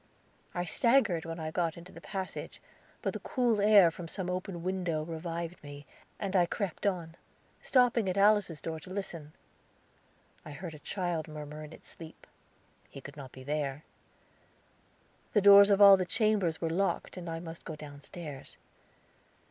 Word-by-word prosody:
I 175 0 -1
staggered 220 -5 +3
when 165 +1 -5
I 155 0 -4
got 165 -1 -1
into 170 +1 -11
the - - -12
passage, 190 -2 -6 0.4
but - - -1
the - - -5
cool 240 -5 +1
air 200 -5 +7
from 170 +1 -8
some 180 +1 -4
open 180 -1 -4
window 180 -4 -1
revived 170 +1 -5
me, 145 0 -10 0.3
and 195 -1 -3
I 175 -2 +4
crept 200 0 -3
on, 170 -4 -2 0.5
stopping 245 -5 +3
at 185 - -2
Alice's 200 -6 +3
door 160 -1 -4
to 155 - -13
listen. 175 -6 -6 1.1
I 150 - -9
heard 165 +3 -7
a 155 - -11
child 175 -1 -3
murmur 150 0 -8
in 150 - -10
its - - -13
sleep. 160 -1 -10 0.6
He - - -10
could 140 +1 -11
not 135 -3 -9
be 130 - -11
there. 145 0 -3 1.5
The 210 - +4
doors 200 0 +9
of 200 -1 +4
all 200 -1 +10
the 185 - -1
chambers 205 -6 +1
were 165 -1 -1
locked, 195 +4 -1
and 175 -2 -7
I 165 0 -4
must 165 -1 -9
go 160 - -6
downstairs. 145 0 -9
170 Hz, 165 wpm, -31 LUFS, 155-195 Hz, 1.5 s, all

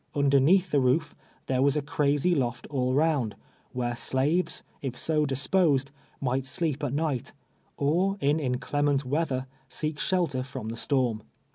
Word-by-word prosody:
Underneath 145 +6 +4
the 145 - +3
roof 135 +5 +1 0.3
tliere 130 -1 +1
was 140 +2 +3
a - - +1
crazy 150 +2 +1
loft 125 -5 -1
all 130 -2 0
round, 140 -8 +1 0.4
where 120 -1 -2
slaves, 135 +9 0 0.2
if 130 -3 -4
so 155 -2 +1
dis])osed, 140 0 +2 0.3
mii;'ht 130 +1 0
sleep 150 0 -1
at 140 - -1
niu 145 -2 0
ht, - - -13 0.4
or 180 +8 +1
in 145 0 +2
inclement 145 +1 0
v/eather 135 -1 -1 0.2
seek 155 -1 -4
shelter 170 -9 0
from 125 -4 -6
tlie 115 - -6
storm. 120 -3 0
140 Hz, 150 wpm, -27 LUFS, 130-155 Hz, 0.4 s, Underneath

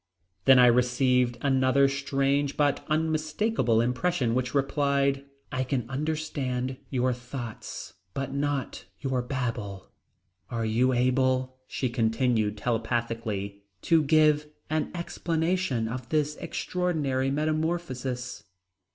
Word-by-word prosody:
Then 130 - +8
I 125 - +8
received 125 0 +3
another 135 0 +4
strange 140 0 0
but 145 -1 +2
unmistakable 155 - +1
impression 125 +1 0
which 125 +2 -1
replied: 140 0 +1 0.3
"I 130 0 0
can 130 -3 -2
understand 135 -3 -2
your 130 -1 +1
thoughts 125 -2 -7 0.2
but 135 -1 -3
not 140 -1 -2
your 130 -3 -1
babble." 115 -7 -4 0.6
"Are 115 -1 -2
you 120 +4 +2
able," 130 +1 +1
she 130 - -2
continued 115 -2 +1
telepathically, 115 -3 -2 0.2
"to 165 -1 +4
give 150 0 +4 0.2
an 155 0 0
explanation 170 -6 -1
of 125 +1 -5
this 150 -1 +1
extraordinary 150 -8 -1
metamorphosis?" 150 -4 -2
130 Hz, 105 wpm, -27 LUFS, 125-145 Hz, 0.6 s, Then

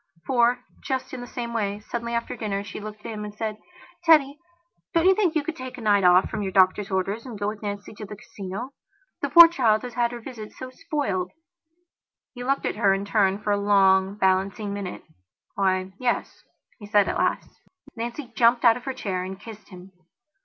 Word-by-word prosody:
For, 245 -1 +2 0.2
just 260 0 -3
in 255 - -5
the 245 - -8
same 235 -1 -5
way, 205 -3 -1
suddenly 235 +2 -4
after 235 - -3
dinner, 200 -2 -3
she 205 - -8
looked 210 0 -8
at - - -4
him 210 -1 -5
and 210 0 -8
said: 215 -1 -4 0.4
"Teddy, 300 -4 +4 0.6
don't 335 +1 +3
you 380 - +7
think 375 -5 +1
you 310 - +1
could 320 +2 -4
take 255 -2 -8
a - - -8
night 205 -3 +3
off 180 +1 +6
from - - -4
your 195 -2 -2
doctor's 190 +1 +3
orders 195 +4 -1
and 245 -5 -8
go 205 0 -2
with 210 0 -8
Nancy 205 0 -5
to 210 0 -8
the 210 - -8
Casino. 200 +5 -7 0.5
The - - -1
poor 340 -1 +11
child 235 -10 +2
has 250 -1 -6
had 240 0 +1
her 240 - -6
visit 225 -3 -9
so 255 0 -8
spoiled." 255 - -2 1.0
He 245 -1 -7
looked 275 +2 0
at - - -2
her 195 -1 +4
in 195 +1 -4
turn 200 -2 +2
for 210 - 0
a 205 - +3
long, 195 -1 +4
balancing 195 +1 0
minute. 200 -3 -6 0.5
"Why, 190 -1 0
yes," 245 -2 -2 0.3
he 205 - -10
said 205 -1 +4
at - - -1
last. - - 0 0.4
Nancy 240 +2 -6
jumped 235 +1 +4
out 230 0 +6
of 250 - -12
her 265 - -2
chair 185 -3 -3
and 190 +1 -7
kissed 215 -1 -12
him. 185 0 -12
215 Hz, 210 wpm, -25 LUFS, 200-245 Hz, 1.0 s, poor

